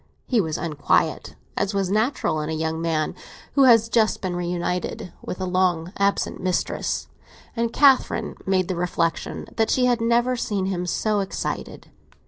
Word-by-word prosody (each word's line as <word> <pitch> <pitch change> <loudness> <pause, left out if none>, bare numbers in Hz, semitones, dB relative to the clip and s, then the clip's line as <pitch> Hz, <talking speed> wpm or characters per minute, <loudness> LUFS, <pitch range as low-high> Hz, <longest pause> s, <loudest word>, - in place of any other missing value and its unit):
He 240 -4 +2
was 160 -4 -2
unquiet, 155 -4 0 0.2
as 200 0 -1
was 195 -2 0
natural 215 - +1
in 150 - -4
a - - -2
young 160 +1 -2
man 160 -2 0 0.4
who 275 -2 +5
has 230 -3 +6
just 225 -2 +2
been 185 -2 -3
reunited 175 +1 -3
to - - -4
a 190 - -3
long 180 -1 0
absent 200 0 0
mistress, 185 -1 -1 0.5
and 230 -1 0
Catherine 265 -5 +3
made 185 -2 +2
the 185 - -2
reflexion 170 -1 -1
that 225 -1 +2
she 255 - +3
had 245 -2 +2
never 235 +2 +2
seen 205 -5 -2
him 180 -2 -2
so 210 +4 0
excited. 195 -1 -4
190 Hz, 160 wpm, -23 LUFS, 175-225 Hz, 0.5 s, has